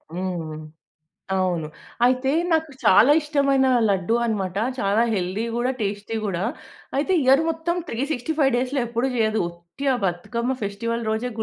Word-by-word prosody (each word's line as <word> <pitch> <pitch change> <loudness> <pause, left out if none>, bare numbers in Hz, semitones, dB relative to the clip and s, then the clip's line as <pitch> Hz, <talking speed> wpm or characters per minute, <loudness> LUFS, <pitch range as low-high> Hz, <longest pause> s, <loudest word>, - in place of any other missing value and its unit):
హ్మ్. 175 -4 -4 0.8
అవును 180 -4 0 0.4
అయితే 255 +2 +2 0.2
నాకు 320 -1 +1
చాలా 225 +9 +6
ఇష్టమైన 280 -3 +2 0.2
లడ్డూ 195 +3 +1
అన్నమాట. 195 -5 -2 0.2
చాలా 200 +2 +2
హెల్దీ 190 +3 -1
గూడా 245 +2 +1
టేస్టీ 205 +1 -3
గూడా. 185 -3 -2 0.5
అయితే 305 +7 +1
ఇయర్ 265 +3 +5
మొత్తం 325 +1 -1
365 275 +3 0
డేస్‌లో 255 +3 0
ఎ‌ప్పుడు 235 +2 -1
జేయదు. 220 -2 +1
ఒట్టి 170 +9 -9
ఆ - - +2
బతుకమ్మ 235 +8 -1
ఫెస్టివల్ 230 +3 -2
రోజే 220 +3 -1
230 Hz, 130 wpm, -23 LUFS, 190-265 Hz, 0.8 s, చాలా